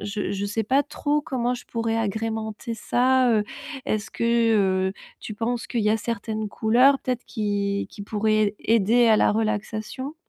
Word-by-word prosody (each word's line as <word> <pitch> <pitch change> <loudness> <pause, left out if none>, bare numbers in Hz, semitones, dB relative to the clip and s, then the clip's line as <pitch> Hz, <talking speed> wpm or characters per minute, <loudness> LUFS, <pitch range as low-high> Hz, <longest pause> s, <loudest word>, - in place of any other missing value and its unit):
je 205 +1 -3
je 200 0 -2
sais 220 +2 -1
pas 270 +6 +2
trop 295 0 -1
comment 250 -3 -1
je 245 - -9
pourrais 230 -1 -2
agrémenter 220 +1 -3
ça, 255 +3 +2
heu, 215 -2 +3 0.4
est-ce 215 0 -1
que, - - -5 0.3
heu, 190 -1 +1 0.3
tu 215 - -7
penses 235 +2 -2
qu'il 235 - -2
y 210 0 +2
a 220 - +3
certaines 220 -1 -3
couleurs 250 +7 +4
peut-être 250 -1 -3
qui 200 -2 -2
qui 200 - -9
pourraient 215 0 +1
aider 230 +2 +3
à 215 - +6
la - - +3
relaxation? 220 +6 -3
220 Hz, 170 wpm, -24 LUFS, 210-240 Hz, 0.4 s, à